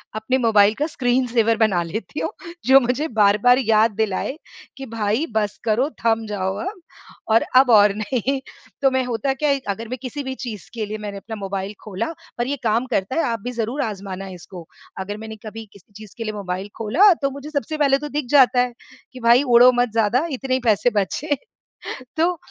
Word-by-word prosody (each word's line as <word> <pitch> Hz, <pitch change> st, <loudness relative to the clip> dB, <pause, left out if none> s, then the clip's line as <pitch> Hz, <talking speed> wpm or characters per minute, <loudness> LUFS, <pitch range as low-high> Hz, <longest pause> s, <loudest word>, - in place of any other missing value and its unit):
अपने 220 Hz, +4 st, 0 dB
मोबाइल 215 Hz, -4 st, +4 dB
का 295 Hz, -, -1 dB
screen 255 Hz, -4 st, 0 dB
saver 230 Hz, -1 st, +2 dB
बना 215 Hz, -6 st, +2 dB
लेती 220 Hz, -, -5 dB
हूँ, -, -, -1 dB, 0.4 s
जो 265 Hz, +1 st, +8 dB
मुझे 255 Hz, +4 st, -1 dB
बार-बार 215 Hz, +1 st, +4 dB
याद 220 Hz, +1 st, +4 dB
दिलाए 220 Hz, +4 st, -1 dB, 0.4 s
कि 270 Hz, -, -7 dB
भाई 225 Hz, +3 st, -1 dB
बस 210 Hz, -2 st, 0 dB
करो, 235 Hz, +6 st, +1 dB, 0.2 s
थम 225 Hz, -1 st, +2 dB
जाओ 190 Hz, -2 st, -2 dB
अब 385 Hz, +1 st, -5 dB, 0.5 s
और 225 Hz, -, +5 dB
अब 260 Hz, 0 st, +6 dB
और 205 Hz, -2 st, +6 dB
नहीं। 245 Hz, +5 st, -1 dB, 0.4 s
तो 270 Hz, -1 st, +4 dB
मैं 260 Hz, 0 st, +1 dB
होता 245 Hz, +2 st, -1 dB
क्या 295 Hz, +3 st, -1 dB
है, 275 Hz, -1 st, +2 dB
अगर 225 Hz, +3 st, -3 dB
मैं 255 Hz, +3 st, -4 dB
किसी 275 Hz, +2 st, -5 dB
भी 265 Hz, 0 st, -4 dB
चीज़ 225 Hz, -7 st, -7 dB
के 225 Hz, -2 st, -3 dB
लिए 210 Hz, +1 st, -5 dB
मैंने 205 Hz, -2 st, -6 dB
अपना 220 Hz, +3 st, -7 dB
मोबाइल 195 Hz, -1 st, -4 dB
खोला 210 Hz, +1 st, -3 dB, 0.3 s
और 240 Hz, -, 0 dB
ये 285 Hz, -, -1 dB
काम 230 Hz, +2 st, +1 dB
करता 195 Hz, +4 st, -1 dB
है 330 Hz, -, +2 dB
आप 230 Hz, -1 st, -1 dB
भी 245 Hz, -, -3 dB
ज़रूर 240 Hz, +4 st, -2 dB
आज़माना 195 Hz, -3 st, -5 dB
इसको। 180 Hz, -2 st, -10 dB, 0.3 s
अगर 205 Hz, +2 st, -5 dB
मैंने 220 Hz, 0 st, -8 dB
कभी 225 Hz, +1 st, -7 dB
किसी 200 Hz, 0 st, -20 dB
चीज़ 215 Hz, -2 st, -13 dB
के 230 Hz, -, -4 dB
लिए 215 Hz, -1 st, -4 dB
मोबाइल 190 Hz, -1 st, -4 dB
खोला 310 Hz, -, +5 dB
तो 275 Hz, -, +1 dB
मुझे 280 Hz, +2 st, -8 dB
सबसे 310 Hz, +1 st, -3 dB
पहले 280 Hz, -2 st, +3 dB
तो 295 Hz, +1 st, -6 dB
दिख 295 Hz, -1 st, -2 dB
जाता 260 Hz, -3 st, +6 dB
है 245 Hz, -1 st, -1 dB, 0.4 s
कि 255 Hz, -, -9 dB
भाई 235 Hz, +3 st, +5 dB
उड़ो 245 Hz, -1 st, +7 dB
मत 245 Hz, 0 st, +1 dB
ज़्यादा, 225 Hz, +6 st, +2 dB
इतने 265 Hz, -1 st, -3 dB
ही 260 Hz, -, +2 dB
पैसे 220 Hz, +1 st, +3 dB
बचे। 285 Hz, +9 st, 0 dB, 0.8 s
तो 345 Hz, +2 st, +2 dB
230 Hz, 205 wpm, -21 LUFS, 210-265 Hz, 0.8 s, जो